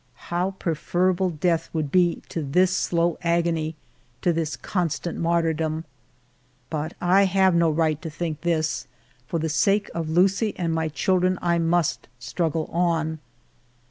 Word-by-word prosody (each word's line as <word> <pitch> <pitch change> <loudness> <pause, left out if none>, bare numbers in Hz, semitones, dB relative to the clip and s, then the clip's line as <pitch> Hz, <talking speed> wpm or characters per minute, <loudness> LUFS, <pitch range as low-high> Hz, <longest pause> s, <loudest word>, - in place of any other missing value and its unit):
How 180 +3 0
preferable 180 +3 0
death 165 0 0
would 155 -4 -2
be 175 -2 +2
to 165 - -3
this 180 +6 +2
slow 170 -2 0
agony, 170 -2 0 0.5
to 175 - +3
this 160 -3 -2
constant 165 +2 -2
martyrdom! 165 -1 0 0.9
But 155 +1 -3
I 185 +3 +4
have 190 0 +3
no 170 -1 +3
right 155 -1 +1
to 165 - -5
think 160 -1 -4
this; 160 -3 -1 0.4
for 170 - -2
the 160 0 -1
sake 200 +6 +1
of 165 -2 -3
Lucie 195 +6 +2
and 170 -2 -1
my 160 -1 0
children 185 +3 +1
I 170 -1 +1
must 165 -1 +1
struggle 155 +6 -2
on. 165 -2 0
170 Hz, 140 wpm, -24 LUFS, 160-180 Hz, 0.9 s, I